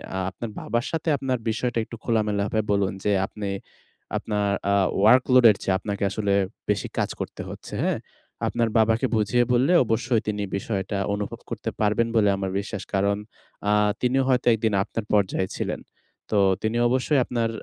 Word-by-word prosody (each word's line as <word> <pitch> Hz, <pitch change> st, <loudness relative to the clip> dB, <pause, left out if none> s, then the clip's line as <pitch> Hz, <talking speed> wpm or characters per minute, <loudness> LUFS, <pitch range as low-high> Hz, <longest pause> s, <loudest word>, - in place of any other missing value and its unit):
আ -, -, -1 dB
আপনার 115 Hz, +4 st, -7 dB
বাবার 120 Hz, +2 st, -1 dB
সাথে 165 Hz, 0 st, -1 dB
আপনার 130 Hz, -1 st, -1 dB
বিষয়টা 120 Hz, +2 st, -1 dB
একটু 115 Hz, -, -9 dB
খোলামেলা 105 Hz, -3 st, +1 dB
ভাবে 110 Hz, -, 0 dB
বলুন, 100 Hz, -2 st, +1 dB
যে 105 Hz, -, +2 dB
আপনি 100 Hz, 0 st, -5 dB, 0.7 s
আপনার 105 Hz, -2 st, -1 dB, 0.2 s
আ -, -, +3 dB, 0.3 s
ওয়ার্কলোডের 125 Hz, +1 st, +6 dB
চেয়ে 95 Hz, -, +1 dB
আপনাকে 100 Hz, 0 st, -4 dB
আসলে 100 Hz, 0 st, 0 dB, 0.4 s
বেশি -, -, 0 dB
কাজ -, -, +1 dB
করতে -, -, -5 dB
হচ্ছে -, -, -9 dB
হ্যাঁ? -, -, 0 dB, 0.5 s
আপনার 115 Hz, -1 st, 0 dB
বাবাকে 110 Hz, +3 st, +3 dB
বুঝিয়ে 110 Hz, +3 st, +2 dB
বললে 130 Hz, +8 st, +3 dB
অবশ্যই 115 Hz, +1 st, +1 dB
তিনি 105 Hz, -1 st, -1 dB
বিষয়টা 100 Hz, 0 st, -3 dB, 0.2 s
অনুভব 105 Hz, 0 st, -4 dB
করতে -, -, -3 dB
পারবেন 105 Hz, +2 st, +2 dB
বলে 105 Hz, -2 st, +4 dB
আমার 95 Hz, -1 st, -3 dB
বিশ্বাস। 100 Hz, -1 st, -5 dB
কারণ 100 Hz, +1 st, +2 dB, 0.5 s
আ -, -, +4 dB, 0.3 s
তিনিও 130 Hz, +2 st, +2 dB
হয়তো 125 Hz, -1 st, +2 dB
১ -, -, +1 dB
দিন 110 Hz, -, +2 dB
আপনার 110 Hz, +1 st, -5 dB
পর্যায়ে 95 Hz, -2 st, +2 dB
ছিলেন। -, -, -3 dB, 0.5 s
তো 105 Hz, -, +2 dB, 0.2 s
তিনি 110 Hz, +2 st, 0 dB
অবশ্যই 130 Hz, +4 st, +2 dB
আ -, -, +3 dB
আপনার 115 Hz, -2 st, -1 dB
110 Hz, 170 wpm, -24 LUFS, 100-120 Hz, 0.7 s, ওয়ার্কলোডের